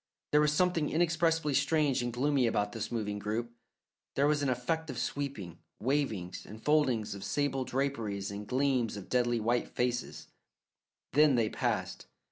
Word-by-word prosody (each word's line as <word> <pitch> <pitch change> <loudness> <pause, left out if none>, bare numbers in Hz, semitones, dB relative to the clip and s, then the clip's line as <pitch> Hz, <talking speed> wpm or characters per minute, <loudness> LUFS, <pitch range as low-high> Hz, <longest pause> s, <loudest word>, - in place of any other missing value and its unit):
There 150 - +5
was 150 0 +3
something 165 -1 +2
inexpressibly 165 -2 +2
strange 145 -1 +2
and 120 0 -2
gloomy 130 +1 +2
about 105 -2 0
this 115 0 -5
moving 105 -3 -2
group; 110 +3 -3 0.6
there 140 - +3
was 150 0 +2
an 140 - +1
effect 150 +6 -1
of 130 - -5
sweeping, 130 - -4 0.2
wavings 110 -9 -1
and 110 - -10
foldings 130 -7 +2
of 100 -1 -8
sable 135 -1 0
draperies 115 -7 -2
and 100 +1 -6
gleams 130 -4 +1
of 100 - -9
deadly 120 -1 +2
white 120 +2 +1
faces; 120 0 -2 0.9
then 150 -1 +5
they 115 -3 +2
passed. - - -2
130 Hz, 155 wpm, -31 LUFS, 110-145 Hz, 0.9 s, There